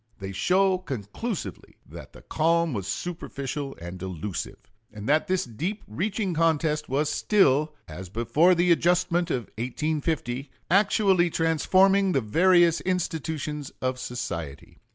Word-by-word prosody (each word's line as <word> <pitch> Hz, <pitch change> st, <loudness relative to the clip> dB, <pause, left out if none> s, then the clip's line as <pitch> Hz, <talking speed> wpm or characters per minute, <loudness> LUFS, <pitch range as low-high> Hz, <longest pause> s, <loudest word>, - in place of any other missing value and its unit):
They 95 Hz, 0 st, -6 dB
show 185 Hz, -, +2 dB
conclusively 130 Hz, -, -6 dB
that -, -, -11 dB
the -, -, -15 dB
calm 165 Hz, 0 st, +1 dB
was 100 Hz, -4 st, -4 dB
superficial 140 Hz, -5 st, -5 dB
and 85 Hz, +2 st, -8 dB
delusive, 95 Hz, 0 st, -5 dB, 0.3 s
and 105 Hz, 0 st, -8 dB
that 155 Hz, +2 st, +2 dB
this 185 Hz, -1 st, 0 dB
deep 165 Hz, -, -4 dB
reaching 195 Hz, -, -2 dB
contest 160 Hz, -2 st, +1 dB
was 145 Hz, +3 st, +1 dB
still, 150 Hz, -4 st, +2 dB
as 90 Hz, +3 st, -8 dB
before 120 Hz, -, +3 dB
the 175 Hz, +1 st, +3 dB
adjustment 175 Hz, 0 st, +2 dB
of 125 Hz, -6 st, -1 dB, 0.2 s
1850, 140 Hz, 0 st, -2 dB, 0.2 s
actually 195 Hz, -2 st, +3 dB
transforming 185 Hz, +4 st, +3 dB
the 135 Hz, -, +2 dB
various 170 Hz, -, +4 dB
institutions 160 Hz, -5 st, -3 dB
of 130 Hz, 0 st, -2 dB
society. 85 Hz, -, -6 dB
155 Hz, 125 wpm, -26 LUFS, 120-180 Hz, 0.3 s, various